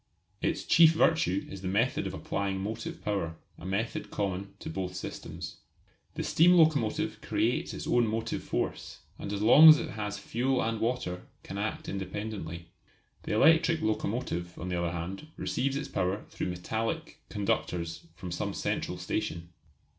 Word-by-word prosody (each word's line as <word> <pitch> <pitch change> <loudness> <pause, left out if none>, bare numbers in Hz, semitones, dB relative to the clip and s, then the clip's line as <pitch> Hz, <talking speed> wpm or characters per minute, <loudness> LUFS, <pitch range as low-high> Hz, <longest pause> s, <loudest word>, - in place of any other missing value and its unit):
Its - - 0
chief 165 -1 +7
virtue 160 - +2
is 95 - -8
the 95 - -4
method 110 +7 +1
of - - -5
applying 100 -1 -2
motive 110 +4 -5
power 95 -6 -1 0.2
a 90 - -7
method 105 +5 -2
common 100 -1 -2
to - - -9
both 90 +2 -4
systems. - - -6 0.6
The - - -2
steam 175 +3 +5
locomotive 155 -10 +3
creates - - 0
its - - -6
own 120 -1 +3
motive 115 +1 -2
force, - - -3 0.2
and 100 - -5
as 105 0 -2
long 150 +8 +10
as 155 - +10
it - - -4
has 105 -1 -4
fuel 125 +6 0
and 115 0 -1
water 115 -7 -2 0.2
can 100 - -6
act 105 +2 -3
independently. 95 -4 -5 0.6
The - - -1
electric 160 +5 +5
locomotive, 105 -5 -2
on 90 - -5
the 90 -1 -1
other 85 -1 0
hand, 90 - -5
receives 135 +1 -1
its 140 0 -3
power 95 +2 -1
through - - -3
metallic 110 +6 -3
conductors 85 -5 -2
from 90 +2 -7
some 85 - -3
central - - -2
station. 85 +1 -3
105 Hz, 160 wpm, -30 LUFS, 90-120 Hz, 0.6 s, long